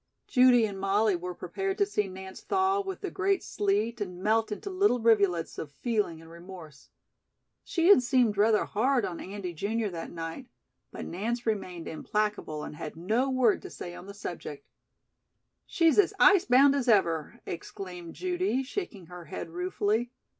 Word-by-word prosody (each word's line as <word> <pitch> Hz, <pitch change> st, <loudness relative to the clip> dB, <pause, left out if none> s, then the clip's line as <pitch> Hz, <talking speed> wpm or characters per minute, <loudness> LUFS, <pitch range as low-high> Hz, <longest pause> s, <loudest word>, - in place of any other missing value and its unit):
Judy 250 Hz, -3 st, +5 dB
and 200 Hz, -2 st, -5 dB
Molly 200 Hz, +1 st, +2 dB
were 180 Hz, +1 st, -5 dB
prepared 385 Hz, -, -3 dB
to 405 Hz, -, +3 dB
see 210 Hz, -, -1 dB
Nance 190 Hz, 0 st, -9 dB
thaw 385 Hz, +1 st, +1 dB
with 385 Hz, -1 st, -6 dB
the 390 Hz, -3 st, -4 dB
great 390 Hz, 0 st, 0 dB
sleet 210 Hz, +3 st, -1 dB
and 180 Hz, -3 st, -4 dB
melt 220 Hz, +1 st, +2 dB
into 390 Hz, -, -5 dB
little 370 Hz, -9 st, +2 dB
rivulets 200 Hz, -7 st, +2 dB
of 150 Hz, -, -6 dB
feeling 210 Hz, -, -1 dB
and 165 Hz, 0 st, -14 dB
remorse. 170 Hz, -4 st, -12 dB, 0.7 s
She 345 Hz, -2 st, +1 dB
had 405 Hz, -, +8 dB
seemed 245 Hz, -4 st, +2 dB
rather 210 Hz, +1 st, +3 dB
hard 245 Hz, +2 st, +1 dB
on 175 Hz, -, -5 dB
Andy, 190 Hz, -2 st, -6 dB
junior, 210 Hz, +5 st, -2 dB
that 165 Hz, -2 st, -6 dB
night; 165 Hz, +10 st, -6 dB, 0.4 s
but -, -, -7 dB
Nance 235 Hz, +7 st, -3 dB
remained 185 Hz, -6 st, -3 dB
implacable 210 Hz, -3 st, -2 dB
and -, -, -7 dB
had 150 Hz, -, -6 dB
no 220 Hz, +11 st, 0 dB
word 255 Hz, -5 st, +2 dB
to -, -, -9 dB
say 175 Hz, -, -8 dB
on 180 Hz, -, -10 dB
the 200 Hz, -, -9 dB
subject. 170 Hz, -7 st, -7 dB, 1.0 s
"She's 330 Hz, +2 st, +3 dB
as 405 Hz, 0 st, +3 dB
ice 375 Hz, -1 st, +6 dB
bound 270 Hz, +3 st, +6 dB
as 275 Hz, -3 st, -1 dB
ever," 170 Hz, -9 st, +2 dB
exclaimed 175 Hz, 0 st, -7 dB
Judy, 360 Hz, -7 st, -1 dB
shaking 260 Hz, -, -5 dB
her 175 Hz, 0 st, -10 dB
head 165 Hz, +1 st, -7 dB
ruefully. 205 Hz, +7 st, -1 dB
210 Hz, 170 wpm, -28 LUFS, 180-260 Hz, 1.0 s, had